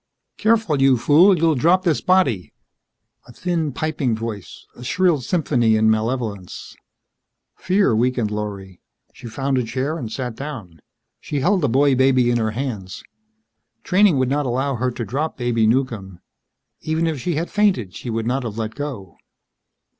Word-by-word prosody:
"Careful, 215 -10 +1
you 135 -2 +5
fool! 175 - +5
You'll 165 0 +3
drop 170 +7 +3
this 165 -5 +1
body." 140 - +1 0.8
A - - -13
thin 165 +2 -2
piping 140 -4 -1
voice. 110 -4 -7
A 125 - -11
shrill 170 +2 +1
symphony 120 -6 +1
in 110 0 +3
malevolence. 110 -4 -3 0.8
Fear 185 - +2
weakened 120 -2 0
Lorry. 100 -3 -6 0.3
She 120 - -11
found 135 +3 -1
a - - 0
chair 135 +7 -3
and 115 -4 -6
sat 125 -1 -4
down. 115 - -8 0.4
She 145 -2 -4
held 185 +5 +2
the 145 - +1
boy 140 +3 +3
baby 130 -2 +3
in 120 - +1
her 110 -1 0
hands. 110 -9 -5 0.8
Training 190 -4 +3
would 130 -1 +1
not 145 0 0
allow 135 +3 -1
her 125 +1 -1
to 120 -1 -5
drop 145 +9 -3
Baby 120 -3 +1
Newcomb. 110 -7 -1 0.6
Even 160 +1 -1
if 160 -4 -2
she 175 +2 -2
had 165 +3 -3
fainted, 190 - +1
she 125 - -7
would 115 0 -2
not 130 +3 0
have 115 -3 -6
let 110 -1 -3
go. 125 - -7
130 Hz, 160 wpm, -21 LUFS, 110-155 Hz, 0.8 s, you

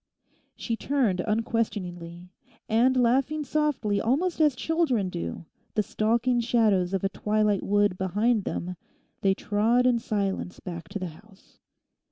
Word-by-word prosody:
She 230 - -3
turned 235 -8 0
unquestioningly. 180 -5 -2 0.4
And 245 +4 +3
laughing 270 +5 +2
softly 265 -9 0
almost 315 +9 0
as 300 -4 +4
children 260 - 0
do, 85 - -5 0.3
the 210 - +2
stalking 235 +4 +1
shadows 215 -6 +2
of 190 - -2
a 195 - +1
twilight 210 0 +1
wood 205 -2 +1
behind 205 +4 +1
them—they 180 +2 -4
trod 225 +6 +2
in 245 -2 +3
silence 200 -4 -2
back 170 -3 -8
to - - -4
the 185 -3 -4
house. 195 +5 -19
215 Hz, 130 wpm, -26 LUFS, 190-245 Hz, 0.4 s, as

